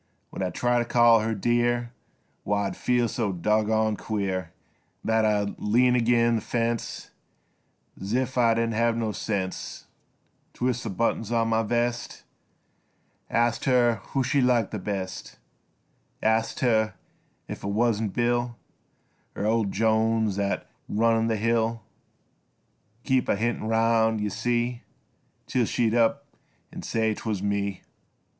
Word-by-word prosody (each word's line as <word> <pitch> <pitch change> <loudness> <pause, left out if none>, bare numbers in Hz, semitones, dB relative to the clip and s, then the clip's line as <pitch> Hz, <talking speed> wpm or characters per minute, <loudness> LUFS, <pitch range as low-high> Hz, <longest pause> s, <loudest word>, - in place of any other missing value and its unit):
When - - -6
I'd 90 -2 -2
try 120 0 +2
to - - +1
call 120 -1 +5
her 110 +1 -1
dear 120 +2 +1 0.5
Why 100 0 0
I'd 100 - -3
feel 125 -1 +1
so 110 -2 -1
doggoned 110 +3 +1
queer 95 -5 -2 0.5
That 110 0 +2
I'd 105 -1 0
lean 125 +4 +3
ag'in' 120 -1 +3
th' - - -12
fence 115 -1 -2 0.9
Zif 125 +6 -1
I 115 -2 +4
didn' 115 0 0
hev 115 +1 +1
no 110 -2 -1
sense 95 -1 -4 0.7
Twist 125 0 -1
th' 95 -5 -5
buttons 115 -1 0
on 115 -1 +1
my 110 0 +2
vest, 120 +1 -2 1.1
Ast 120 0 +1
her 120 -3 +3
who 135 - -1
she 140 +2 +1
liked 120 -5 +2
th' 105 -4 -4
best, 95 -3 -5 0.9
Ast 110 +1 +1
her 110 -4 +2 0.5
if - - -7
it - - -3
wuzn't 110 0 +1
Bill 120 0 0 0.8
Er 100 - -2
old 110 -2 +1
Jones 110 0 +1
thet 100 -1 -1 0.2
run 115 +1 +2
th' 110 -2 0
mill, 115 0 0 1.2
Keep 130 -1 +1
a - - +3
hintin' 115 +1 -1
'round 110 0 +2
yuh 105 -1 -2
see 120 +3 -1 0.6
Till 125 -2 +1
she'd 115 0 0
up 115 -1 +2 0.5
an' - - -7
say 110 -1 0
'twuz 105 -3 -4
me. 100 -1 -2
115 Hz, 135 wpm, -26 LUFS, 105-120 Hz, 1.2 s, call